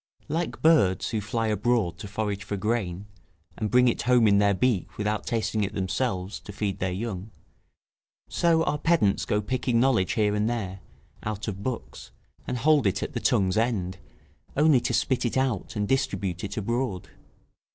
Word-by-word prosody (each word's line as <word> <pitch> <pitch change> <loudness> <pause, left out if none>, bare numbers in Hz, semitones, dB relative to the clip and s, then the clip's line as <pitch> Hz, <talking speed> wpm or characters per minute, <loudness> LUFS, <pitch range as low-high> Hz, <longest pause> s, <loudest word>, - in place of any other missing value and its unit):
Like 165 +3 -2
birds 100 - +4
who 110 - -1
fly 115 +2 -2
abroad 105 -5 +1
to 100 - -6
forage 100 0 -3
for 100 0 -4
grain, 100 -3 -2 0.5
and 110 -2 -2
bring 125 +2 +5
it 120 - +1
home 120 -2 +4
in 100 -1 +5
the 100 -1 +3
beak, 120 -7 0
without 105 0 -2
tasting 110 -2 0
it 100 +1 -3
themselves, 95 0 -2
to - - -10
feed 100 -1 -3
their 95 0 -1
young; 100 0 -4 1.0
so 165 -1 +2
our 150 - -1
pedants 155 -13 +2
go 105 0 0
picking 125 +1 0
knowledge 120 -7 +2
here 105 -2 +2
and 105 +2 +1
there, 100 -5 -3 0.4
out 105 0 -4
of 100 -2 -4
books, 125 +2 -5 0.4
and 125 - -2
hold 145 -1 +4
it 95 0 0
at 150 - -5
the 120 - -2
tongue's 100 -7 +2
end, 95 -6 0 0.6
only 150 -4 +5
to - - -1
spit 130 - +1
it 120 +1 -1
out 130 -6 -1
and 105 -1 -1
distribute 100 -9 -1
it 100 +1 -5
abroad. 115 -2 -2
105 Hz, 175 wpm, -26 LUFS, 100-125 Hz, 1.0 s, bring